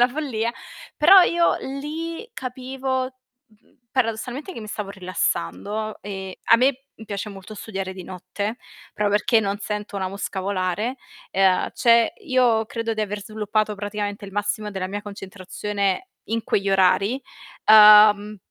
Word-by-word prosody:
la 245 - +7
follia. 245 -5 -2 0.4
Però 370 +4 +8
io 340 0 +2
lì 320 - -5
capivo, 260 +1 -3 0.4
mhmm, 215 0 -30
paradossalmente 250 - -2
che 230 - -8
mi 215 - -8
stavo 205 -1 -5
rilassando, 185 - -3
e 190 -2 -7
a 230 - +6
me 260 +2 +2 0.3
piace 205 0 -5
molto 195 +2 -10
studiare 195 -3 -5
di 185 -2 -9
notte, 190 +5 -5 0.4
proprio 210 -1 0
perché 220 +2 +3
non 200 0 -2
sento 210 -1 -5
una 190 -1 -1
mosca 195 0 -5
volare. 195 +5 -2 0.4
E 195 - -1
a 185 -1 +3
cioè 235 -1 +4
io 245 -5 +3
credo 230 -1 -3
di 215 - -3
aver 210 -1 -3
sviluppato, 215 0 -1
praticamente 205 0 -4
il 195 - -9
massimo 205 +1 -2
della 190 -2 -3
mia 205 +2 -5
concentrazione 200 - -4 0.2
in 225 0 -2
quegli 195 0 0
orari, 195 +6 +3 0.5
uhm, 210 -1 +8
210 Hz, 145 wpm, -23 LUFS, 200-240 Hz, 0.5 s, Però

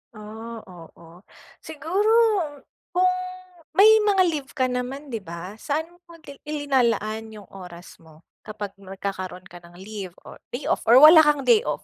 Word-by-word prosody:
Ah, 220 +2 -9
oo. 170 -1 -15 0.4
Siguro, 330 +8 -2 0.8
kung 365 0 +3 0.6
may 435 +4 +7
mga 405 -3 +3
leave 290 -3 -6
ka 260 -3 +1
naman, 260 +3 -5
di 225 - -3
ba? 180 +2 -9
Saan 315 +6 -3 0.2
mo 340 - -14
dil 280 -2 -12
ilinalaan 235 -7 -1
yung 205 -3 -13
oras 180 -2 -12
mo 160 0 -20 0.2
kapag 210 -2 -6
nagkakaroon 190 -1 -7
ka 175 -1 -13
ng 170 0 -18
leave 190 -1 -9
or - - -13 0.2
day 265 - -6
off? - - -1
Or 235 - +6
wala 315 +2 +10
kang 295 -3 +3
day 445 - +5
off? - - -3
225 Hz, 155 wpm, -23 LUFS, 185-300 Hz, 0.8 s, wala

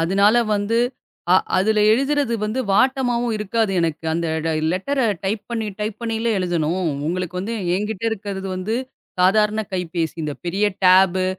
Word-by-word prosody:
அதனால 200 +6 +3 0.2
வந்து 205 +3 0 0.5
அ - - +7 0.2
அதுல 210 +3 +2
எழுதுறது 275 0 +1
வந்து 215 +5 -1
வாட்டமாவும் 245 +1 +2
இருக்காது. 215 +1 0
எனக்கு 165 -1 -2
அந்த 170 +1 -1 0.5
லெட்டர 270 +10 -1 0.2
டைப் 205 +2 -1
பண்ணி, 225 -2 -2
டைப் 210 0 -3
பண்ணி 230 -1 -2 0.2
எழுதணும். 175 -1 -1 0.3
உங்களுக்கு 180 +1 -3
வந்து 220 +5 -3 0.2
எங்கிட்ட 210 +1 -3
இருக்கிறது 200 -3 -5
வந்து 195 +5 -2 0.5
சாதாரண 210 +3 +3
கைப்பேசி. 170 -3 -2
இந்தப் 150 -2 -5
பெரிய 195 +4 0 0.2
டேப்பு 185 0 +5
200 Hz, 135 wpm, -21 LUFS, 185-225 Hz, 0.5 s, அ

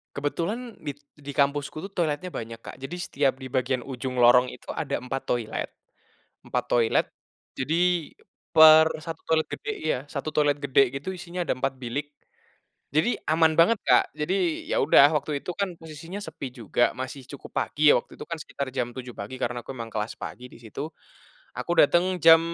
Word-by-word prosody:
Kebetulan 205 - -3
di 145 - -2 0.2
di 145 -1 -8
kampusku 140 +1 0
tuh - - -25
toiletnya 165 +1 -1
banyak, 115 -9 -6
Kak. - - -10
Jadi 135 +6 -7
setiap 140 -5 +1
di 130 - -7
bagian 130 0 0
ujung 125 0 -5
lorong 125 +1 +6
itu - - -14
ada 140 -2 -2
empat 130 +2 -4
toilet 120 -3 -2 0.7
empat - - -2
toilet. 115 -2 +2 0.5
Jadi 170 +3 +1 0.4
per 160 0 +8
1 160 +1 -7
toilet 160 -1 +1
gede 430 - -6
iya, 315 - 0
1 150 +2 -4
toilet 145 -1 +3
gede 135 -2 +3
gitu 190 +7 -5
isinya 175 0 -5
ada - - +1
4 130 +1 -2
bilik. 135 +4 -4 0.8
Jadi 160 +11 +2
aman 160 0 +3
banget, 210 +7 +5
Kak. - - +3
Jadi 175 +1 -1
ya - - +1
udah 140 - +7
waktu 145 0 -2
itu - - -5
kan 200 -2 -1
posisinya 165 +5 -8
sepi 155 -7 -7
juga, 120 0 +1
masih 130 +1 -6
cukup 140 0 -10
pagi 150 0 +2
ya, - - +6
waktu - - -10
itu - - -8
kan 165 - -2
sekitar 140 -2 -5
jam 125 -2 -2
7.00 125 -1 -7
pagi 100 +6 -6
karena 120 0 -1
aku - - -6
memang 115 -2 -6
kelas 110 0 -3
pagi 125 - -7
di - - -14
situ. 120 +6 -6 0.7
Aku - - -3
datang 175 +5 +4
jam 165 +1 +9
145 Hz, 180 wpm, -26 LUFS, 130-165 Hz, 0.8 s, jam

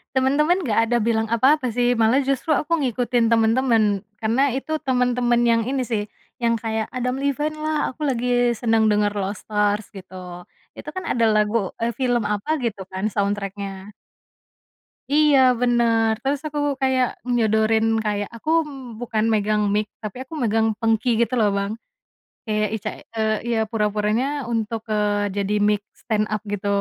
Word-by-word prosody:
Temen-temen 300 +8 +2
nggak 230 - +1
ada 240 - +3
bilang 220 0 +1
apa-apa 250 +2 +2
sih, 245 0 +2
malah 230 +5 +3
justru 275 +4 0
aku 320 +3 +1
ngikutin 240 -4 +1
temen-temen, 225 -3 +2 0.2
karena 245 +4 +2
itu 310 +4 -2
temen-temen 245 -2 +2
yang 230 -1 +3
ini 265 +2 -1
sih, 220 -4 -2 0.3
yang 235 -1 +1
kayak 220 -1 -2
Adam 250 +1 -2
Levine 295 +2 -1
lah, 310 0 -1
aku 300 +4 -5
lagi 245 -2 +1
seneng 225 -1 +1
denger 205 0 +2
"Lost 200 +2 -4
Stars" 210 0 0
gitu. 185 -3 -10 0.3
Itu - - -7
kan 370 - -5
ada 230 -2 +2
lagu 210 -1 +1
eee, 230 - +1
film 245 -5 0
apa 260 +9 -1
gitu 205 -6 -3
kan 190 +3 -1
soundtrack-nya. 200 -1 -3 1.2
Iya, 295 -2 +5 0.2
bener, 235 -2 +3
terus 275 +1 0
aku 295 -1 -4 0.2
kayak 260 -1 +2 0.3
nyodorin, 220 -1 +2 0.2
kayak 205 -1 -1
aku 230 +7 -6 0.5
bukan 225 -3 -1
megang 210 0 +1
mic, 210 0 0 0.2
tapi 215 +2 -6
aku 265 - -14
megang 225 -1 +2
pengki 225 +2 +1
gitu 235 - 0
loh 215 - +4
Bang, 200 +1 -2 0.7
kayak 215 -1 0
ica 215 0 -4 0.3
eee, 220 0 +1 0.2
ya 230 - +1
pura-puranya 210 +2 0 0.3
untuk, 225 -1 -2
eee, 205 -1 0
jadi 200 +1 0
mic 210 -1 +1 0.2
stand 215 -2 0
up 215 - -2
gitu. 205 0 -3
225 Hz, 155 wpm, -22 LUFS, 210-250 Hz, 1.2 s, Iya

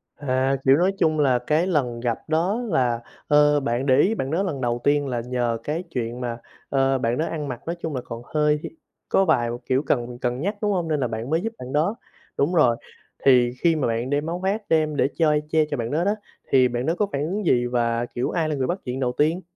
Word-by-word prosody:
À, 135 -1 0
kiểu, 135 +2 +6
nói 185 +3 +2
chung 155 -2 +2
là, 130 -4 +3
cái 155 +8 +1
lần 125 -9 0
gặp 120 -2 -1
đó 175 +9 +1
là, 120 -8 +1 0.3
ờ, 150 0 +5
bạn 130 -1 -1
để 130 -2 +4
ý 215 +8 +3
bạn 135 -5 -3
đó 185 +5 +1
lần 145 -8 -3
đầu 120 0 -1
tiên 145 0 +2
là 120 -3 -2
nhờ 120 -1 -1
cái 160 +4 -2
chuyện 120 -2 -4
mà, 120 -1 -3 0.3
ờ, 135 -1 +2
bạn 120 -1 0
đó 160 - 0
ăn 155 -3 -4
mặc, 125 -3 -5
nói 170 - -2
chung 155 -4 -3
là, 125 - -2
còn 115 0 -7
hơi 150 0 +2 0.5
có 195 - +3
vài, 120 -8 +2 0.2
kiểu, 130 +3 +2
cần 120 -3 -1
cần 125 +1 -1
nhắc, 200 +5 -1
đúng 210 -1 +1
hông? 175 -4 0
Nên 155 -2 0
là 125 - 0
bạn 115 +3 -5
mới 160 +2 +1
giúp 225 +3 -3
bạn 125 +2 -8
đó, 170 +9 +1 0.4
đúng 145 +6 +1
rồi, 125 -7 +5 0.5
thì 125 -3 +5
khi 170 -2 +4
mà 150 -6 0
bạn 115 +3 -1
đem 145 +1 0
áo 175 +2 -3
khoác 195 +4 -1
đem 155 -2 +2
để 135 - +3
chơi 150 -2 +3
che 155 -1 +3
cho 145 - -1
bạn 115 0 -3
đó 160 +4 +1
đó, 205 +3 +1 0.4
thì 130 -2 +5
bạn 120 +1 -3
đó 165 +4 +1
có 210 - +2
phản 140 - -1
ứng 195 +4 -3
gì 120 -5 +3
và, 120 -1 0
kiểu, 120 +1 -3
ai 160 -3 0
là 150 - -1
người 130 -2 -1
bắt 180 +2 -2
chuyện 125 +2 -3
đầu 125 -2 0
tiên? 155 +7 +1
140 Hz, 250 wpm, -23 LUFS, 125-160 Hz, 0.5 s, kiểu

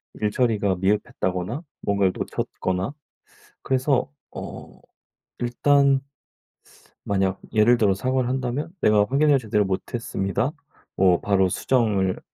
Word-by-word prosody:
일처리가 105 -2 +1
미흡했다거나 95 - -1 0.2
뭔가를 100 -2 +1
놓쳤거나 95 +6 -3 0.7
그래서 130 0 +1 0.2
어 - - -9 0.6
일단 140 +3 +3 1.1
만약 95 -1 0
예를 115 +3 +4
들어 100 -4 +3
사과를 130 +4 0
한다면 130 +3 -2
"내가 105 -1 +4
확인을 140 +1 +4
제대로 105 -4 0
못했습니다." 100 +4 -2 0.4
뭐 90 -2 +4
"바로 95 -2 +2
수정을 100 -3 +1
105 Hz, 265 characters per minute, -24 LUFS, 95-130 Hz, 1.1 s, 예를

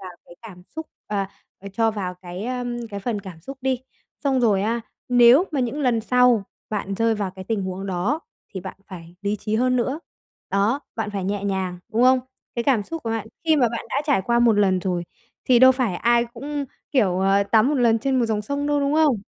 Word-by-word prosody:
vào 185 -1 -8
cái - - -15
cảm 185 -6 -11
xúc 320 0 -4 0.2
ờ, 200 -2 -1 0.3
ờ, 200 - -9
cho 225 +2 +2
vào 190 -4 -4
cái, 180 +2 -8
ơ, 250 0 -3 0.3
cái 200 -1 -5
phần 215 -1 -2
cảm 185 -5 -10
xúc 270 +10 -9
đi. 260 -1 0 0.4
Xong 270 -2 +2
rồi 205 -5 +3
á, 230 +2 0 0.3
nếu 245 +6 +7
mà 290 -4 -1
những 255 +4 -2
lần 245 -4 +2
sau 250 -1 +4 0.3
bạn 200 -2 -2
rơi 225 +2 +2
vào 200 -3 -2
cái 190 0 -10
tình 215 -1 -1
huống 185 +1 -4
đó 195 - -1 0.3
thì 190 - -3
bạn 190 +1 -8
phải 170 -2 -11
lý 205 +1 0
trí 210 +1 -3
hơn 255 +1 +2
nữa, 265 +5 -1 0.5
đó, 210 +8 +1 0.2
bạn 225 -2 -2
phải 195 -2 -3
nhẹ 200 +1 -2
nhàng, 190 -2 -2
đúng 230 +2 +2
không? 255 +1 +6 0.4
Cái 235 - -2
cảm 255 -7 +3
xúc 330 +10 -7
của 230 - -3
bạn, 225 -1 -2 0.2
khi 315 -2 +4
mà 245 -4 +4
bạn 235 - -5
đã - - -1
trải 270 -10 +2
qua 235 +4 +1
một 240 -1 +5
lần 200 -3 +3
rồi 175 -2 -2 0.4
thì 250 -2 +5
đâu 260 +1 +8
phải 250 -7 -1
ai 235 +5 +3
cũng, 280 +5 -5 0.3
kiểu, 195 -10 +2
ờ, 195 +1 +3
tắm 215 +5 +3
một 300 - +1
lần 235 -3 +3
trên 260 +3 0
một 235 - +2
dòng 215 -2 -1
sông 285 +5 -2
đâu, 290 -1 +1
đúng 280 +1 +1
không? 305 -5 +4
225 Hz, 235 wpm, -23 LUFS, 195-255 Hz, 0.5 s, đâu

